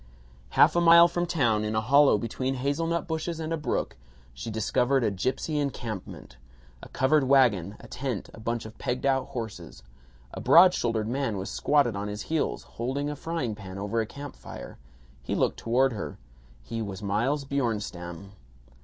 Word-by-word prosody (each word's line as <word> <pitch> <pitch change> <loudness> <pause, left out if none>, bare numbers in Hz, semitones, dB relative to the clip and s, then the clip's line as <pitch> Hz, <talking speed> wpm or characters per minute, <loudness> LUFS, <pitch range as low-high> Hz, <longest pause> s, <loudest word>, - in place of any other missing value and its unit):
Half - - +6
a 175 - +3
mile 170 0 +8
from 175 0 -2
town, 120 -11 +1
in 110 0 -2
a - - +3
hollow 140 +1 +5
between 130 +5 -2
hazelnut 165 +7 -1
bushes 160 0 -3
and 160 0 -3
a - - +2
brook, 150 - -2 0.4
she 65 - -7
discovered 125 +4 +1
a 110 - +1
gipsy 130 - -1
encampment: 110 - -5 0.4
a - - -11
covered 140 +1 +2
wagon, 115 -9 +3
a 120 - -12
tent, 120 -2 -4
a - - -12
bunch 115 +1 -3
of 110 0 -10
pegged 125 +2 -2
out 135 -1 +2
horses. 100 - -7 0.5
A - - -6
broad 180 +2 +7
shouldered 115 -6 -1
man 125 -3 -1
was 95 +1 -5
squatted 140 -7 +2
on 100 +1 -3
his 105 +1 -5
heels, 160 -2 -1
holding 140 +5 -3
a - - -5
frying 145 -6 -3
pan 95 -3 -9
over 105 +3 -1
a 110 - -3
camp 140 +2 -9
fire. - - -10 0.4
He - - -3
looked - - 0
toward 125 +3 +2
her. 105 - -6 0.5
He 115 - -5
was 100 -1 -6
Miles 130 +8 0
Bjornstam. 100 -9 -3
125 Hz, 175 wpm, -27 LUFS, 105-145 Hz, 0.5 s, mile